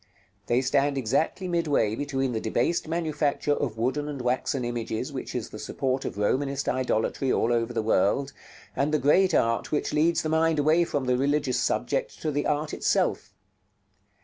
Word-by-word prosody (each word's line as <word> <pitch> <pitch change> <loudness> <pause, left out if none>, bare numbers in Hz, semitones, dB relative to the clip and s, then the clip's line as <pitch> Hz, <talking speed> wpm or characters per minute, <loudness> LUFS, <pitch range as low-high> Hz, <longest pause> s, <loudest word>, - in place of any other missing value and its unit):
They 120 +2 +2
stand 140 +2 +1
exactly 145 - 0
midway 155 -11 +1
between 135 -1 -1
the 110 -2 -2
debased 120 +10 0
manufacture 155 -3 0
of 125 -6 -2
wooden 135 +6 -1
and 140 -2 -5
waxen 125 +1 -1
images 120 -2 -3
which - - -6
is - - -3
the - - -8
support 130 0 -2
of - - -5
Romanist 135 +6 0
idolatry 130 +1 0
all 120 - +2
over 115 0 0
the 115 -2 -1
world, 115 +6 +1 0.4
and 140 +2 0
the 155 - +3
great 160 +6 +3
art 115 0 +1
which 150 - -1
leads 160 +3 +2
the 155 - -2
mind 160 0 +2
away 155 +4 +3
from 145 -4 -2
the 125 0 +1
religious 140 -1 +1
subject - - -1
to 155 - 0
the 145 0 -1
art 150 0 -1
itself. - - 0
140 Hz, 175 wpm, -26 LUFS, 125-150 Hz, 0.4 s, the